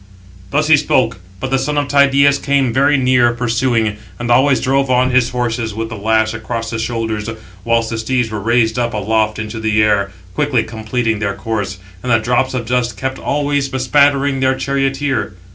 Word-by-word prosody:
Thus 150 Hz, +8 st, +1 dB
he 155 Hz, -1 st, +6 dB
spoke; 130 Hz, -7 st, +1 dB, 0.2 s
but 130 Hz, +5 st, -4 dB
the 135 Hz, -, +2 dB
son 145 Hz, +3 st, -2 dB
of 145 Hz, -1 st, 0 dB
Tydeus 140 Hz, 0 st, +4 dB
came 140 Hz, -4 st, +1 dB
very 140 Hz, +3 st, +3 dB
near, 125 Hz, -2 st, +3 dB
pursuing, 120 Hz, -2 st, 0 dB, 0.2 s
and 120 Hz, +3 st, -3 dB
always 130 Hz, +2 st, +4 dB
drove 135 Hz, +1 st, +1 dB
on 130 Hz, 0 st, +2 dB
[his 125 Hz, -1 st, +3 dB
horses] 120 Hz, -3 st, -2 dB
with 115 Hz, 0 st, -4 dB
the 110 Hz, -, -6 dB
lash 110 Hz, +1 st, +1 dB
across 115 Hz, 0 st, -4 dB
the 115 Hz, -, -3 dB
shoulders; 110 Hz, -2 st, -3 dB, 0.3 s
whilst 115 Hz, 0 st, 0 dB
the 115 Hz, -, -3 dB
steeds 120 Hz, 0 st, -1 dB
were 105 Hz, -, -3 dB
raised 115 Hz, +2 st, +1 dB
up 120 Hz, -2 st, -1 dB
aloft 105 Hz, +1 st, 0 dB
into 110 Hz, +1 st, -5 dB
the 110 Hz, -1 st, +2 dB
air, 100 Hz, -2 st, +2 dB, 0.2 s
quickly 140 Hz, -1 st, +1 dB
completing 110 Hz, 0 st, -2 dB
their 100 Hz, -2 st, -2 dB
course, 100 Hz, -1 st, -3 dB, 0.2 s
and 125 Hz, -, -3 dB
the 115 Hz, -, +5 dB
drops 125 Hz, +3 st, 0 dB
of 120 Hz, -2 st, -3 dB
dust 120 Hz, -2 st, -1 dB
kept 130 Hz, 0 st, -4 dB
always 145 Hz, -1 st, -1 dB
bespattering 140 Hz, +1 st, +2 dB
their 130 Hz, 0 st, +2 dB
charioteer. 135 Hz, -5 st, -1 dB
120 Hz, 185 wpm, -16 LUFS, 110-135 Hz, 0.3 s, he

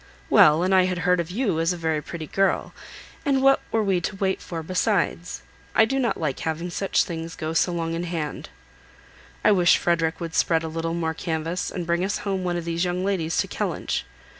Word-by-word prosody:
"Well, 155 Hz, +3 st, +6 dB
and 185 Hz, +1 st, +2 dB
I 185 Hz, -1 st, +5 dB
had 185 Hz, -1 st, -1 dB
heard 180 Hz, 0 st, +3 dB
of 170 Hz, -1 st, -2 dB
you 195 Hz, -4 st, 0 dB
as 165 Hz, +2 st, +2 dB
a -, -, -6 dB
very 160 Hz, -2 st, -1 dB
pretty 160 Hz, +2 st, -7 dB
girl, 195 Hz, +5 st, 0 dB, 0.5 s
and 270 Hz, -3 st, +1 dB
what 270 Hz, 0 st, +6 dB
were 225 Hz, -1 st, +2 dB
we 190 Hz, -3 st, +1 dB
to 190 Hz, -, -3 dB
wait 190 Hz, -1 st, -1 dB
for 165 Hz, -2 st, -6 dB
besides? 185 Hz, 0 st, -1 dB, 0.3 s
I 220 Hz, -, +6 dB
do 270 Hz, +4 st, -1 dB
not 245 Hz, -3 st, 0 dB
like 150 Hz, -4 st, -2 dB
having 165 Hz, +2 st, -3 dB
such 195 Hz, +3 st, +1 dB
things 165 Hz, -1 st, -6 dB
so 165 Hz, +3 st, +1 dB
long 165 Hz, -1 st, -2 dB
in 170 Hz, +1 st, -2 dB
hand. 165 Hz, -4 st, -4 dB, 0.9 s
I -, -, +5 dB
wish 180 Hz, -4 st, +5 dB
Frederick 165 Hz, -1 st, 0 dB
would 165 Hz, -2 st, -5 dB
spread 165 Hz, 0 st, +2 dB
a -, -, -3 dB
little 165 Hz, +1 st, -3 dB
more 165 Hz, -1 st, -1 dB
canvass, 165 Hz, +1 st, -3 dB
and 175 Hz, -, -4 dB
bring 170 Hz, +1 st, 0 dB
us 195 Hz, +2 st, -1 dB
home 190 Hz, -2 st, -1 dB
one 175 Hz, -1 st, -1 dB
of 170 Hz, -, -4 dB
these 170 Hz, +1 st, -1 dB
young 180 Hz, +1 st, -1 dB
ladies 165 Hz, -5 st, -1 dB
to -, -, +1 dB
Kellynch. -, -, -2 dB
175 Hz, 215 wpm, -24 LUFS, 165-190 Hz, 0.9 s, Well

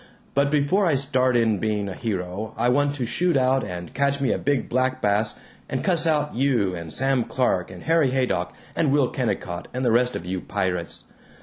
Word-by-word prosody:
But 140 Hz, 0 st, +2 dB
before 150 Hz, +7 st, +2 dB
I 155 Hz, -, +3 dB
start 130 Hz, -2 st, +2 dB
in 110 Hz, -4 st, +2 dB
being 105 Hz, -1 st, -1 dB
a 95 Hz, -, -4 dB
hero 100 Hz, +1 st, -4 dB
I 120 Hz, -, +2 dB
want 145 Hz, +2 st, +2 dB
to 130 Hz, -4 st, -2 dB
shoot 170 Hz, +6 st, +1 dB
out 130 Hz, 0 st, +2 dB
and 90 Hz, -2 st, -6 dB
catch 140 Hz, +1 st, +1 dB
me 135 Hz, -, +1 dB
a -, -, 0 dB
big 145 Hz, -3 st, 0 dB
black 130 Hz, +1 st, 0 dB
bass 105 Hz, 0 st, +1 dB, 0.3 s
and -, -, -2 dB
cuss 170 Hz, -3 st, +3 dB
out 150 Hz, -2 st, +1 dB
you 120 Hz, -7 st, +1 dB
and 85 Hz, -2 st, -6 dB
Sam 135 Hz, +4 st, +1 dB
Clark 115 Hz, -8 st, 0 dB
and 90 Hz, -2 st, -10 dB
Harry 160 Hz, -4 st, +3 dB
Haydock 130 Hz, -1 st, 0 dB, 0.2 s
and 155 Hz, -4 st, +2 dB
Will 140 Hz, -3 st, +3 dB
Kennicott 90 Hz, -8 st, -3 dB
and 130 Hz, 0 st, -1 dB
the 120 Hz, -, +3 dB
rest 125 Hz, +2 st, +2 dB
of 85 Hz, -, -5 dB
you 90 Hz, 0 st, -3 dB
pirates. 90 Hz, -4 st, -3 dB
125 Hz, 205 wpm, -24 LUFS, 100-140 Hz, 0.3 s, I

